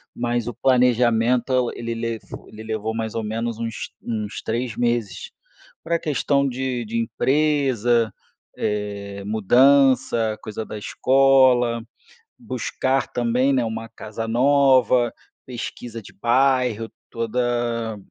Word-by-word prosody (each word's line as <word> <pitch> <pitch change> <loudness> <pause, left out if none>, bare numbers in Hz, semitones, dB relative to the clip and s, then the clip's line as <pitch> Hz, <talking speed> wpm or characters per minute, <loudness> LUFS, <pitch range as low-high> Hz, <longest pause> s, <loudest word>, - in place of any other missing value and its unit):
mas 120 -1 -1
o 120 - -3
planejamento 125 0 +2
ele 115 0 -4
levo 115 -1 -6
ele 110 0 -11
levou 110 0 -3
mais 110 -1 -3
ou 115 - -3
menos 115 +1 -3
uns 115 -1 -4
uns 110 -2 -4
3 115 +1 -3
meses. 120 -5 -1 0.5
Pra 170 +1 0
questão 140 -2 +1
de 130 -2 -3
de 115 +2 -3
empresa, 125 -5 +1 0.4
eh, 100 -1 -3
mudança, 120 +1 +3
coisa 110 0 -6
da 110 - -7
escola. 130 -1 +3 0.6
Buscar 135 - -1
também, 125 +3 +1
né, 125 -3 +2
uma 115 0 -5
casa 110 +1 -6
nova, 130 -1 +4 0.3
pesquisa 120 -2 -7
de - - -14
bairro, 125 -1 +1 0.2
toda 115 -1 -1
120 Hz, 115 wpm, -22 LUFS, 110-130 Hz, 0.6 s, nova